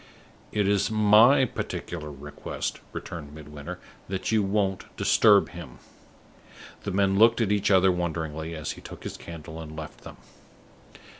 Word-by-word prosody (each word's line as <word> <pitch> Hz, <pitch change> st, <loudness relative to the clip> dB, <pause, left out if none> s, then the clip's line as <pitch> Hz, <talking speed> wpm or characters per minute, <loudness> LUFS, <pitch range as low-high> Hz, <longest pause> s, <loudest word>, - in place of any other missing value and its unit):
"It 105 Hz, -2 st, +1 dB
is 100 Hz, -1 st, +2 dB
my 110 Hz, +5 st, +6 dB
particular 85 Hz, -8 st, -5 dB
request," 75 Hz, +1 st, -5 dB
returned 75 Hz, -3 st, -7 dB
Midwinter, 75 Hz, -1 st, -8 dB, 0.3 s
"that 95 Hz, +2 st, -3 dB
you 110 Hz, -1 st, +3 dB
won't 100 Hz, -1 st, 0 dB
disturb 105 Hz, -3 st, +5 dB
him." 85 Hz, -1 st, -10 dB, 1.1 s
The -, -, -1 dB
men 95 Hz, 0 st, +2 dB
looked 115 Hz, +1 st, +6 dB
at 110 Hz, -4 st, +1 dB
each 105 Hz, -1 st, +2 dB
other 95 Hz, -1 st, +5 dB
wonderingly, 80 Hz, -2 st, -3 dB
as 75 Hz, -2 st, -4 dB
he -, -, -10 dB
took -, -, -10 dB
his -, -, -5 dB
candle 80 Hz, -1 st, -9 dB
and 80 Hz, -1 st, -9 dB
left 80 Hz, -1 st, -8 dB
them. -, -, -11 dB
95 Hz, 145 wpm, -26 LUFS, 80-105 Hz, 1.1 s, my